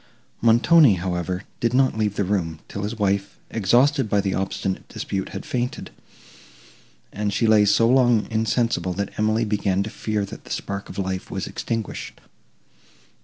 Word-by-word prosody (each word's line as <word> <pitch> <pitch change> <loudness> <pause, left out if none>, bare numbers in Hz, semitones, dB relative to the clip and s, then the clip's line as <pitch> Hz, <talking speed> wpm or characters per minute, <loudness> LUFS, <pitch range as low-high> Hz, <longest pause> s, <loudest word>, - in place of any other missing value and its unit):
Montoni, 120 - +6
however, 90 +1 -3 0.2
did 120 +1 0
not 130 -2 +3
leave 105 -2 0
the 100 - 0
room, 90 -5 -1
till 100 - -6
his 105 +3 -4
wife, 100 -1 -1
exhausted 120 +5 +3
by 100 - +2
the 100 -1 0
obstinate 95 0 -3
dispute, 95 -1 -4
had - - -7
fainted, 125 0 -3 1.2
and 105 0 -1
she 110 +4 +1
lay 110 -2 +5
so 110 +3 +4
long 120 -3 +4
insensible, 110 -3 0
that 100 +2 -3
Emily 110 +2 +2
began 100 -2 0
to 105 - -6
fear 105 -2 -2
that 100 - -10
the - - -15
spark 100 0 -4
of - - -9
life 95 -1 -3
was - - -3
extinguished. 115 -3 -5
105 Hz, 160 wpm, -23 LUFS, 95-115 Hz, 1.2 s, Montoni